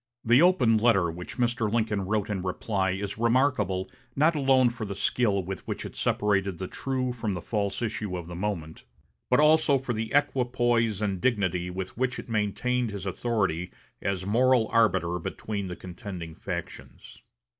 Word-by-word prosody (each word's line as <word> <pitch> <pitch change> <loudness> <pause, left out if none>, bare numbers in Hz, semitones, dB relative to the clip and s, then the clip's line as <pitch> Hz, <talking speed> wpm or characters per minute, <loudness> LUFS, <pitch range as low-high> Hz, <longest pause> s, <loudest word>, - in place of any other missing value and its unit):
The 120 +5 +6
open 130 -12 +4
letter 100 -7 +3
which 90 +2 -8
Mr. 120 -3 0
Lincoln 110 -3 0
wrote 105 0 0
in 95 -3 -2
reply 95 +1 -1
is 100 +2 -3
remarkable 115 -6 +2 0.3
not 155 +4 +4
alone 135 -4 +4
for 120 -1 -6
the 100 -2 -4
skill 100 -1 +1
with 95 +1 -5
which - - -4
it - - -8
separated 100 -3 +1
the 95 - -4
true 130 +1 -2
from 115 -4 -3
the - - -3
false 100 +1 -2
issue 105 -4 -2
of 85 - -6
the 85 - -8
moment, 85 -4 -4 0.5
but 125 - +4
also 150 -2 +5
for 130 -2 -3
the 110 0 -3
equipoise 120 -6 +1
and 95 -3 -1
dignity 95 -7 0
with 95 +1 -5
which 130 0 0
it - - -8
maintained 115 +3 0
his 100 -2 -6
authority 95 -4 -1 0.3
as 95 -1 -2
moral 120 +2 +3
arbiter 90 -6 +2
between 100 +3 -4
the 90 - -5
contending 90 -3 -8
factions. 65 -4 -8
105 Hz, 165 wpm, -27 LUFS, 95-120 Hz, 0.5 s, The